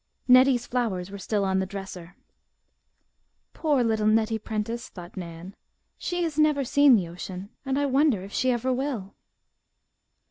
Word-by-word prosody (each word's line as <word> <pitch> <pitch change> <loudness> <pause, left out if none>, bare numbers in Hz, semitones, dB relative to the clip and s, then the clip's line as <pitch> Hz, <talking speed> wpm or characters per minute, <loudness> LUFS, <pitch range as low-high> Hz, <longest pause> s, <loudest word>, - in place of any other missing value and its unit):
Nettie's 255 -1 +5
flowers 200 -7 -2
were 200 - -7
still 200 +1 -1
on 190 0 +1
the 190 - -1
dresser. 190 -3 -8 1.4
"Poor 290 -6 +1
little 220 -2 +1
Nettie 220 +1 +2
Prentice," 220 +2 -4
thought 175 -2 -11
Nan. 175 +1 -8 0.4
"She 355 0 -2
has 315 -2 -2
never 300 -2 +3
seen 280 0 +5
the 185 -6 0
ocean 180 +3 -8 0.2
and 265 0 0
I 285 - +1
wonder 270 -7 +2
if 200 - -10
she 255 - +1
ever 250 +1 0
will!" 250 -7 -3
220 Hz, 150 wpm, -26 LUFS, 190-265 Hz, 1.4 s, Nettie's